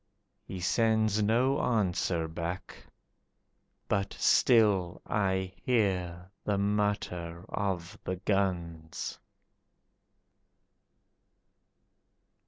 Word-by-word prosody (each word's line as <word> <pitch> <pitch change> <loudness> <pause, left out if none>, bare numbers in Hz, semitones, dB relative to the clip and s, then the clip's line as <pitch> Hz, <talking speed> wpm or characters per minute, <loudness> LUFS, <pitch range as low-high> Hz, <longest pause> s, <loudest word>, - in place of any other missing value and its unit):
He 95 - -6
sends 110 +2 +2
no 125 +6 +2
answer 90 -7 +1
back, 85 +2 -5 1.1
But 100 0 0
still 100 -7 +3
I 95 -2 0
hear 95 -6 0
the 105 -1 0
mutter 100 -4 -1
of 90 -4 -3
the 95 - -2
guns. 90 -4 -2
95 Hz, 65 wpm, -30 LUFS, 90-105 Hz, 1.1 s, still